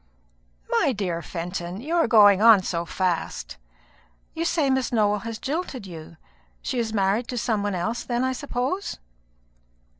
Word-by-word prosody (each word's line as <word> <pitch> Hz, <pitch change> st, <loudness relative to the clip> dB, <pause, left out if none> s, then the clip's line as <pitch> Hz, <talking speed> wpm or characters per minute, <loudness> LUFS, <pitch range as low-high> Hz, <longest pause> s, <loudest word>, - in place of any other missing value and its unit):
"My 270 Hz, -, +2 dB
dear 180 Hz, -6 st, -2 dB
Fenton, 175 Hz, +2 st, -5 dB
you 300 Hz, +8 st, -5 dB
are 340 Hz, -1 st, +3 dB
going 205 Hz, -4 st, +6 dB
on 220 Hz, -4 st, +7 dB
so 170 Hz, -1 st, -2 dB
fast! 180 Hz, -1 st, -2 dB, 0.8 s
You 330 Hz, +1 st, -2 dB
say 320 Hz, -4 st, +1 dB
Miss 265 Hz, -1 st, 0 dB
Nowell 210 Hz, -3 st, +2 dB
has 230 Hz, +2 st, -6 dB
jilted 275 Hz, -, -4 dB
you. 165 Hz, -2 st, -10 dB, 0.5 s
She 250 Hz, -, -2 dB
is 225 Hz, -2 st, -1 dB
married 205 Hz, +3 st, +1 dB
to 250 Hz, -, -4 dB
some 220 Hz, -2 st, 0 dB
one 205 Hz, -1 st, -1 dB
else, 220 Hz, +7 st, -2 dB
then, 240 Hz, 0 st, -1 dB
I 260 Hz, 0 st, +1 dB
suppose?" 275 Hz, +7 st, -3 dB
220 Hz, 155 wpm, -24 LUFS, 190-255 Hz, 0.8 s, on